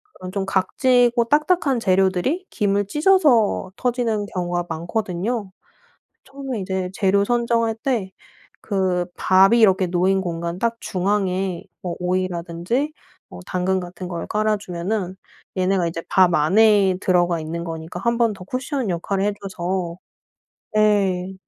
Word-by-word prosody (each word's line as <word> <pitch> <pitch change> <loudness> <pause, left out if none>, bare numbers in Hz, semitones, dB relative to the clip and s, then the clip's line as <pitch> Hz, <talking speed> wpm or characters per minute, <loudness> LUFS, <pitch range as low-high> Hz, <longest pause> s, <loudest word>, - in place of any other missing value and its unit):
그런 185 0 -8
좀 195 -1 -2
각지고 240 +5 +2
딱딱한 300 0 +2
재료들이 190 - +1
김을 205 -2 0
찢어서 295 - +3
터지는 235 -4 -1
경우가 175 -2 -2
많거든요. 190 +5 -3 0.7
처음에 270 -4 -6
이제 190 -1 -3
재료 200 0 +2
선정할 235 0 +1
때 225 -8 -1 0.6
그 185 -3 0
밥이 195 +5 +4
이렇게 190 -4 +4
놓인 185 +2 +1
공간 170 -1 -4
딱 230 +1 0
중앙에 190 -1 -1 0.2
뭐 180 -2 -3
오이라든지 180 - -2 0.4
뭐 90 - -10
당근 185 +1 0
같은 180 0 -7
걸 170 -2 -5
깔아 215 0 +1
주면은 185 0 -3 0.4
얘네가 185 -1 +1
이제 165 0 -4
밥 185 -2 +4
안에 195 +4 +4
들어가 175 -3 +2
있는 165 +2 -5
거니까 165 +1 -6
1 235 0 +1
번 230 -2 +2
더 190 - -11
쿠션 255 +3 -3
역할을 190 +3 -1
해 205 0 +1
줘서 180 -2 -3 0.8
예 195 -3 +2
190 Hz, 270 characters per minute, -21 LUFS, 180-225 Hz, 0.8 s, 밥이